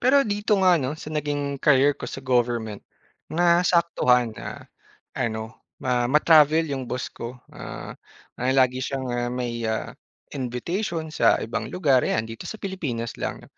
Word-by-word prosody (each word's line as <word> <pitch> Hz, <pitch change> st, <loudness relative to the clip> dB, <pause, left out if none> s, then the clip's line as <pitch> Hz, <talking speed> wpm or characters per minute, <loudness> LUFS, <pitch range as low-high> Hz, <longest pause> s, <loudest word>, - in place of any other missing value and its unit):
Pero 275 Hz, +3 st, +5 dB
dito 205 Hz, 0 st, +1 dB
nga 180 Hz, -4 st, +5 dB
'no, 135 Hz, +4 st, -2 dB
sa 155 Hz, 0 st, -8 dB
naging 145 Hz, -2 st, -2 dB
career 145 Hz, 0 st, +5 dB
ko -, -, -7 dB
sa 135 Hz, -, -8 dB
government, 120 Hz, -4 st, 0 dB, 0.5 s
nasaktuhan 170 Hz, -8 st, +3 dB
na -, -, -8 dB, 0.5 s
ano, 110 Hz, -1 st, -4 dB, 0.2 s
ma 125 Hz, -1 st, 0 dB
ma-travel 155 Hz, +2 st, +5 dB
yung 130 Hz, -3 st, -4 dB
boss 125 Hz, 0 st, -4 dB
ko. 120 Hz, +2 st, -7 dB, 0.2 s
Ah, -, -, -8 dB, 0.5 s
ah, 130 Hz, +1 st, +2 dB
lagi 130 Hz, 0 st, +3 dB
siyang, 130 Hz, -1 st, -3 dB
ah, 120 Hz, 0 st, -1 dB
may, 120 Hz, -1 st, -3 dB
ah, 110 Hz, -, -2 dB, 0.4 s
invitation 160 Hz, -, -3 dB
sa -, -, +4 dB
ibang 115 Hz, -1 st, -3 dB
lugar, 140 Hz, -8 st, +3 dB
ayan, 110 Hz, -, 0 dB
dito 115 Hz, 0 st, -8 dB
sa 220 Hz, -, -5 dB
Pilipinas 145 Hz, -, -4 dB
lang. -, -, -4 dB
130 Hz, 150 wpm, -24 LUFS, 120-165 Hz, 0.5 s, Pero